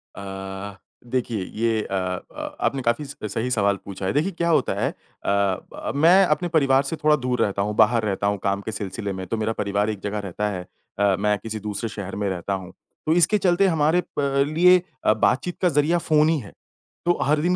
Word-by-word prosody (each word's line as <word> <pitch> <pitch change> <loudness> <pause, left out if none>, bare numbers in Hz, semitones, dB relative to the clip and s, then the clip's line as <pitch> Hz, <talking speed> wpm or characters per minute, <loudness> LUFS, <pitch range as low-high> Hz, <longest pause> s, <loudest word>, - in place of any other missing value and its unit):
अ, 95 0 -7 0.4
देखिए 120 -6 -1 0.2
ये 115 -2 +2
अ 95 - 0
अ, 90 -1 -4
आपने 135 -1 0
काफ़ी 120 +5 0
स 140 - -9 0.2
सही 120 +3 -1
सवाल 100 -4 +2
पूछा 100 -1 -6
है, 95 - 0
देखिए 160 +7 +1
क्या 170 -1 -1
होता 160 - +2
है - - +1
अ, - - -21 0.3
ब 100 -2 -1
मैं 175 +6 +6
अपने 175 +2 +1
परिवार 140 -4 +3
से 150 +4 -3
थोड़ा 150 0 +5
दूर 125 -2 -1
रहता 100 -1 +1
हूँ, 105 +1 -1
बाहर 110 +1 +4
रहता 100 0 0
हूँ 100 0 +1
काम 100 0 0
के 110 - -5
सिलसिले 100 -1 -4
में, 95 0 -5
तो 115 - -2
मेरा 110 +1 -1
परिवार 100 +1 0
एक 105 -2 -3
जगह 105 +1 -2
रहता 105 +4 -2
है 90 -3 -5 0.3
अ, 100 -2 +4
मैं 105 0 +2
किसी 110 -1 -5
दूसरे 105 +2 -4
शहर 100 -2 -6
में 100 -1 -1
रहता 95 +1 -3
हूँ, 95 -2 -5 0.3
तो 155 - +3
इसके 175 +5 +4
चलते 190 0 +3
हमारे 160 +1 +2 0.2
प 140 -1 +2
लिए 180 +4 +5 0.2
अ, - - +6
बातचीत 130 - +1
का 180 - +4
ज़रिया 150 +3 +2
फ़ोन 155 -2 +3
ही 165 - +2
है, 105 - -11 0.5
तो 175 - +3
हर 150 +1 +2
दिन 180 +3 +2
110 Hz, 220 wpm, -23 LUFS, 100-150 Hz, 0.5 s, मैं